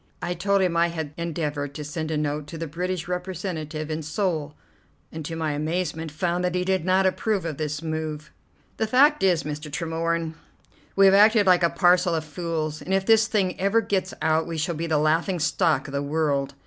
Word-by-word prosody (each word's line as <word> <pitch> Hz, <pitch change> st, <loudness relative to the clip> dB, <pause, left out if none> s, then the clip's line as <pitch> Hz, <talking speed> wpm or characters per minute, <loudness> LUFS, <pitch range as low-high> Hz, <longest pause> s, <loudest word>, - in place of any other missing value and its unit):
I 175 Hz, -, -2 dB
told 195 Hz, +2 st, +1 dB
him 175 Hz, -2 st, 0 dB
I 170 Hz, 0 st, +4 dB
had 160 Hz, -3 st, -5 dB
endeavoured 150 Hz, -4 st, -3 dB
to 150 Hz, -, -5 dB
send 155 Hz, +2 st, -4 dB
a 155 Hz, -, -1 dB
note 150 Hz, 0 st, -2 dB
to 165 Hz, -, -8 dB
the 165 Hz, -, -4 dB
British 175 Hz, +3 st, -3 dB
representative 175 Hz, -4 st, -4 dB
in 155 Hz, +1 st, -2 dB
Seoul, 155 Hz, -2 st, -2 dB, 0.6 s
and 160 Hz, 0 st, -6 dB
to 165 Hz, -, -4 dB
my 160 Hz, -2 st, -1 dB
amazement 160 Hz, +1 st, -2 dB
found 175 Hz, +4 st, -1 dB
that 180 Hz, 0 st, 0 dB
he 180 Hz, 0 st, 0 dB
did 190 Hz, -2 st, +1 dB
not 185 Hz, +2 st, +3 dB
approve 190 Hz, 0 st, 0 dB
of 155 Hz, -4 st, -4 dB
this 150 Hz, 0 st, -3 dB
move. 155 Hz, -1 st, -4 dB, 0.5 s
"The 220 Hz, -, 0 dB
fact 285 Hz, +6 st, +4 dB
is, 180 Hz, -4 st, +3 dB
Mr. 150 Hz, 0 st, -6 dB
Tremorne, 165 Hz, +1 st, -2 dB, 0.6 s
we 195 Hz, -, +6 dB
have 195 Hz, -, +7 dB
acted 210 Hz, +1 st, +6 dB
like 185 Hz, -1 st, +5 dB
a 170 Hz, -, +4 dB
parcel 175 Hz, 0 st, +3 dB
of 160 Hz, -1 st, -2 dB
fools, 155 Hz, -1 st, -3 dB
and 190 Hz, -, -1 dB
if 195 Hz, 0 st, 0 dB
this 225 Hz, 0 st, +5 dB
thing 195 Hz, -5 st, 0 dB
ever 200 Hz, +4 st, +3 dB
gets 190 Hz, -4 st, -1 dB
out 160 Hz, +1 st, +2 dB
we 165 Hz, -1 st, -4 dB
shall 160 Hz, +2 st, -1 dB
be 165 Hz, +1 st, -3 dB
the 160 Hz, -2 st, +2 dB
laughing 160 Hz, +5 st, +1 dB
stock 160 Hz, +1 st, +1 dB
of -, -, -8 dB
the 140 Hz, -, -1 dB
world. 140 Hz, -2 st, -1 dB
165 Hz, 210 wpm, -25 LUFS, 155-185 Hz, 0.6 s, have